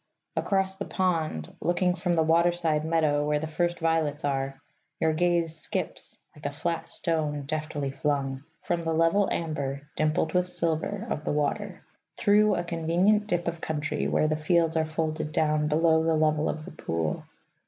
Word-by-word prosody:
Across 190 -1 0
the - - -4
pond, 160 - -1
looking 180 +1 +2
from 180 -1 -1
the 165 -1 +3
waterside 165 -1 +2
meadow 155 -2 +2
where 150 0 +1
the 150 - -3
first 175 +2 -1
violets 160 -2 0
are, 135 -1 -1 0.4
your 160 -1 +2
gaze 170 -1 +1
skips 155 - -4 0.2
(like 145 -1 -5
a - - -3
flat 165 +3 -3
stone 150 -3 -1
deftly 150 -1 -3
flung) 135 -1 -1 0.2
from 175 -1 -1
the 165 -1 -1
level 165 +5 +3
amber 140 -4 -2
(dimpled 155 +1 +1
with 180 0 +2
silver) 175 +4 -1
of 150 - -2
the - - -1
water, 175 +6 -2 0.3
through 210 +1 +4
a 175 - -1
convenient 175 +5 +2
dip 175 -4 -1
of 170 -1 -3
country 150 -2 -2
where 155 - +2
the 155 - +1
fields 165 +1 +2
are 160 -1 +2
folded 155 -1 -2
down 155 -1 +1
below 160 +1 +3
the 165 0 +2
level 155 0 +2
of 155 0 -4
the - - -9
pool. 80 - -2
160 Hz, 170 wpm, -27 LUFS, 150-175 Hz, 0.4 s, through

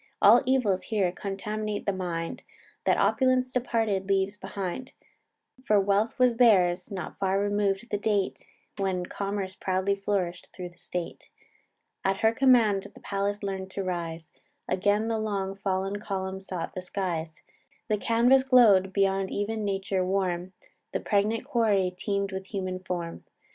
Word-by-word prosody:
All 230 +4 +7
evils 240 -8 +2
here 200 -5 0
contaminate 210 +3 -4
the 200 - +1
mind, 170 -3 -4 0.4
That - - +3
opulence 255 -1 +2
departed 225 -6 0
leaves 195 +1 +1
behind: 200 +4 -5 0.7
For 210 -5 +4
wealth 200 +3 +1
was 250 -2 +3
theirs, 185 -7 +4
not 185 -5 -6
far 195 0 +1
remov'd 205 +1 0
the 205 - 0
date, 205 -2 0 0.4
When 185 -2 0
commerce 195 0 -3
proudly 190 +1 0
flourish'd 195 -3 -2
thro' 180 -1 -7
the 175 - -22
state; 175 -2 -6 0.7
At 195 +1 0
her 220 - +5
command 230 -6 +4
the - - -12
palace 200 +1 -2
learn'd 190 -1 -3
to 195 - -2
rise, 170 -3 -4 0.4
Again 205 +3 +1
the 225 -1 0
long 200 -3 -2
fall'n 195 +1 -2
column 190 -1 -4
sought 185 -3 -5
the 185 - -4
skies; 175 -4 -4 0.4
The 215 - +1
canvass 240 +5 +4
glow'd, 220 -8 +6
beyond 195 -1 +1
e'en 215 +2 -2
nature 195 -1 -1
warm; 185 -1 -1 0.4
The - - 0
pregnant 210 +4 0
quarry 210 -8 +2
teem'd 200 +1 -2
with 190 0 -5
human 185 -2 -3
form. 175 -2 -5
195 Hz, 145 wpm, -27 LUFS, 185-215 Hz, 0.7 s, All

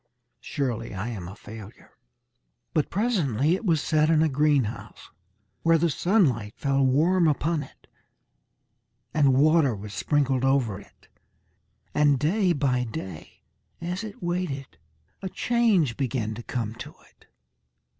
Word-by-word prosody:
Surely 120 -7 -3
I 100 +5 -3
am 95 -7 -6
a 95 - -9
failure." 110 0 -12 0.8
But 155 - +1
presently 170 - +1
it 190 - -2
was 165 -5 +2
set 155 -1 +2
in 160 -1 +4
a 160 - +2
greenhouse, 140 -5 -1 0.5
where 165 0 +4
the 165 0 +1
sunlight 135 - +1
fell 140 -1 +1
warm 165 +7 +3
upon 155 +1 0
it, 135 - -13 1.3
and 140 -4 +4
water 150 -3 +4
was 105 +1 -8
sprinkled 135 -1 +1
over 130 -7 +1
it, - - -19 0.9
and 145 -2 +4
day 180 +7 +2
by 135 -5 +1
day 110 - -8 0.4
as 180 +4 -4
it 210 -4 -9
waited, 155 - -3 0.4
a 190 - -4
change 210 - +2
began 120 -5 -2
to 115 - -7
come 115 -3 -4
to 150 +5 -8
it. - - -27
140 Hz, 135 wpm, -26 LUFS, 120-165 Hz, 1.3 s, in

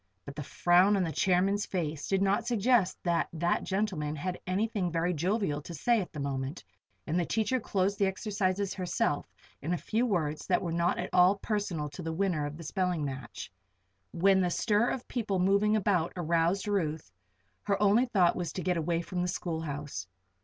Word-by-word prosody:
But 140 - -8
the 150 - -5
frown 180 +7 +3
on 190 - +2
the 165 - -2
chairman's 190 +4 +2
face 160 -5 -3
did 195 0 +1
not 205 +4 +1
suggest 235 -3 +2
that 170 -2 +1
that 170 +1 0
gentleman 190 -7 -1
had 180 +4 -4
anything 195 -1 0
very 165 +2 0
jovial 175 -2 0
to 170 +3 -8
say 230 +8 +2
at 180 - -7
the 150 - -7
moment, 140 +2 -3 0.4
and 165 +3 0
the - - +2
teacher 225 +6 0
closed 200 -2 -1
the 200 - +3
exercises 195 -1 -1
herself 180 -5 -1 0.3
in 160 +5 -1
a - - 0
few 230 +7 0
words 155 -7 -1
that 185 0 +2
were 170 - -2
not 170 +1 +1
at - - -4
all 180 +2 +6
personal 200 -8 -2
to 145 - -9
the 165 -1 -3
winner 165 -5 0
of 150 +1 -7
the 165 - -9
spelling 180 -2 -1
match. 130 -6 -7 0.6
When 190 +2 +3
the 180 - +1
stir 210 +5 +2
of 255 - -4
people 215 -6 -1
moving 200 +3 +3
about 190 -5 +1
aroused 170 +3 +1
Ruth, 160 - -1 0.5
her 200 -1 +1
only 210 +5 +4
thought 185 -7 +3
was 175 -2 -3
to 185 - -4
get 180 -1 +1
away 165 +1 0
from 180 +1 -3
the 180 - 0
schoolhouse. 150 - -4
180 Hz, 190 wpm, -30 LUFS, 165-200 Hz, 0.6 s, all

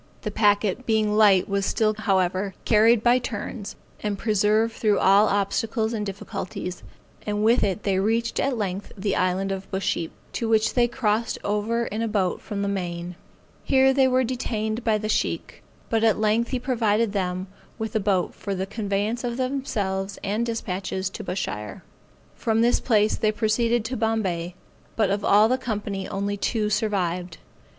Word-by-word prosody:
The 210 - -3
packet 205 +2 +2
being 215 -2 +2
light 205 -4 +5
was 200 0 0
still, 215 +2 +1
however, 190 -2 0
carried 225 +1 +5
by 245 +1 +5
turns, 215 -2 -5 0.3
and 205 -1 -2
preserved 215 +2 +2
through 210 -3 +1
all 200 +3 +5
obstacles 220 +3 0
and 215 -2 -2
difficulties; 195 -2 -5 0.4
and 210 0 -1
with 230 +3 +4
it 200 +1 -1
they 195 -2 +1
reached 230 +3 0
at 270 -3 0
length 195 -2 -3
the 200 0 -1
island 185 +2 0
of 195 0 -5
Busheap, 190 -3 -1 0.2
to 230 - -2
which 220 -1 +3
they 240 -1 +3
crossed 230 -2 0
over 215 +3 0
in 215 +1 -3
a 230 - 0
boat 195 -4 0
from 200 -1 -4
the - - -1
main. 175 -3 -3 0.5
Here 265 0 +4
they 265 -1 +4
were 260 0 +3
detained 225 -2 -2
by 220 -2 +2
the 215 0 -4
Sheikh, - - -2 0.3
but 225 -1 0
at 220 -2 +4
length 220 +2 +1
he 260 - -1
provided 230 -4 +1
them 185 -2 -1 0.3
with 220 -1 -4
a - - +3
boat 195 -3 0
for 200 -1 -4
the 190 +1 -2
conveyance 205 +3 -2
of 240 -1 -2
themselves 205 -8 -2
and 210 +3 0
dispatches 190 -4 -3
to - - -7
Bushire. 105 - -4 0.5
From 225 0 0
this 240 +1 +3
place 215 -3 +2
they 215 - +2
proceeded 225 +2 +1
to 255 +3 -3
Bombay, 190 -6 -1 0.4
but 210 -4 +2
of 200 +1 -1
all 210 +2 +5
the 255 +2 +1
company 205 -5 -3
only 200 +1 -2
two 210 +1 -1
survived. 180 -5 -1
210 Hz, 170 wpm, -24 LUFS, 195-225 Hz, 0.5 s, light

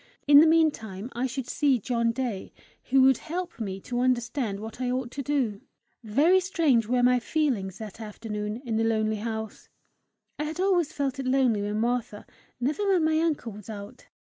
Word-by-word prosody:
In 285 0 +9
the 320 - +7
meantime 255 -10 +1
I 250 +2 -1
should 260 0 -4
see 270 +1 +2
John 235 +1 0
Day, 235 -5 -4 0.3
who 265 0 +4
would 265 -2 +5
help 345 0 -5
me 195 -4 -4
to 245 +4 -3
understand 240 -4 0
what 220 +3 -8
I 250 - 0
ought 250 -1 -2
to 280 - -5
do! 260 -8 -1 0.4
Very 295 - +4
strange 315 - +2
were 245 +1 +1
my 250 0 +4
feelings 235 - -1
that 220 0 -9
afternoon 210 +1 -5
in 225 -2 -1
the 225 - +1
lonely 220 -1 +1
house. 220 0 -5 0.7
I 300 - -1
had 315 +3 -5
always 365 -5 +2
felt 275 -2 -2
it 265 - -3
lonely 255 -5 +2
when 210 +1 -2
Martha, 235 -2 -2 0.3
never 300 +11 -1
when 365 -4 +3
my 315 0 +2
uncle 310 -8 -1
was 210 +1 -11
out. 205 -2 -9
245 Hz, 185 wpm, -27 LUFS, 220-285 Hz, 0.7 s, In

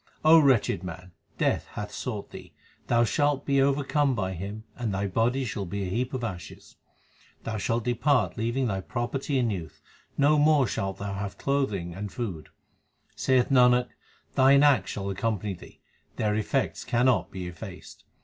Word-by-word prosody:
O 160 +1 +8
wretched 130 -10 +3
man, 90 +1 -8 0.3
Death - - 0
hath 105 0 -5
sought 110 -5 -5
thee; - - -11 0.3
thou 120 0 +3
shalt 145 +3 +1
be 140 -1 +3
overcome 140 0 +2
by 95 -4 -2
him, 100 +5 -6
and 120 -4 -3
thy 100 +1 -1
body 115 +7 0
shall 100 -4 -4
be 100 +2 -3
a 90 - -4
heap 125 +5 -1
of 125 - -4
ashes. 95 -7 -7 0.7
Thou 110 -1 -3
shalt 115 +3 -1
depart 120 - +1
leaving 120 +4 -1
thy 95 -5 -1
property 130 +6 -2
and 120 -3 +1
youth; 85 -7 -6 0.4
no 145 +2 +4
more 150 -2 +4
shalt 95 -2 -3
thou 100 0 -4
have 100 0 -5
clothing 105 -12 -1
and 100 +2 -6
food. 95 -10 -5 0.7
Saith 130 -2 +2
Nanak, 125 -1 +5 0.4
thine 140 +2 +5
acts 135 -10 +4
shall 100 -1 -4
accompany 105 0 -2
thee, 90 - -14 0.3
their 105 -1 0
effects 110 +6 -1
cannot 120 -5 +2
be 95 -1 -6
effaced. 90 -1 -10
115 Hz, 165 wpm, -27 LUFS, 100-135 Hz, 0.7 s, O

